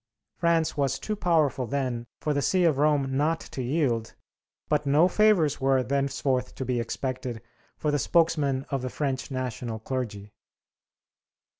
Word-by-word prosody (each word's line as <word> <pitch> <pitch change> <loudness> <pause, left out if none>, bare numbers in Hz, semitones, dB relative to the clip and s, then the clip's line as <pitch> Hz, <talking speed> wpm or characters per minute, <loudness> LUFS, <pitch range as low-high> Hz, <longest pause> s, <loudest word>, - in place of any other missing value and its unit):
France 165 -1 +2
was 135 -2 0
too 215 - -3
powerful 155 - +1
then 125 -2 -2
for 150 - 0
the 145 - 0
see 185 +6 +2
of 155 -5 +3
Rome 145 -3 +2
not 160 +4 +1
to 130 - -7
yield, 125 -4 0 0.5
but 150 -1 0
no 150 +5 +5
favors 185 -8 +3
were 135 -1 +3
thenceforth 135 -1 -1
to 130 - -4
be 125 -1 0
expected 125 0 -3 0.4
for 150 - 0
the 145 - +1
spokesman 145 -5 +2
of 135 -2 -1
the 130 - -3
French 135 -1 -2
national 125 -3 -4
clergy. 110 -4 -5
135 Hz, 150 wpm, -27 LUFS, 130-155 Hz, 0.5 s, no